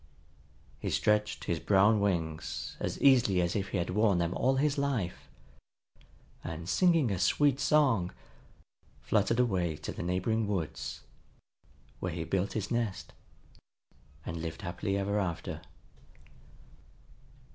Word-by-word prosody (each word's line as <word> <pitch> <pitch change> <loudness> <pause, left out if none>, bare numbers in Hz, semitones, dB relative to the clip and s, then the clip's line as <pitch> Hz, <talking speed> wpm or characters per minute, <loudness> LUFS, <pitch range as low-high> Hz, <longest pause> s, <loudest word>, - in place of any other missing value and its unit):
He - - -3
stretched 105 0 +1
his 85 - -1
brown 105 +4 +4
wings 85 -6 -2
as - - -3
easily 125 -9 +5
as 85 -1 0
if 100 -2 -1
he 100 - -2
had 90 0 -1
worn 105 -1 +3
them 85 0 0
all 130 +2 +2
his 145 +1 +1
life, 125 -11 -2 1.2
and, 80 +1 -6
singing 165 - +3
a 95 - -1
sweet 140 +8 +3
song, 130 -14 +3 0.9
fluttered 110 +3 +1
away 90 -9 +1
to 75 - -6
the - - -6
neighboring 95 +5 0
woods, 75 -11 -3 1.0
where 90 - -3
he 80 0 -3
built 95 +4 -1
his 105 -2 -3
nest, 115 -5 -2 1.1
and 85 - -4
lived 80 +5 -6
happily 95 +2 -2
ever 100 +1 0
after. 85 -4 -3
100 Hz, 125 wpm, -30 LUFS, 85-115 Hz, 1.2 s, easily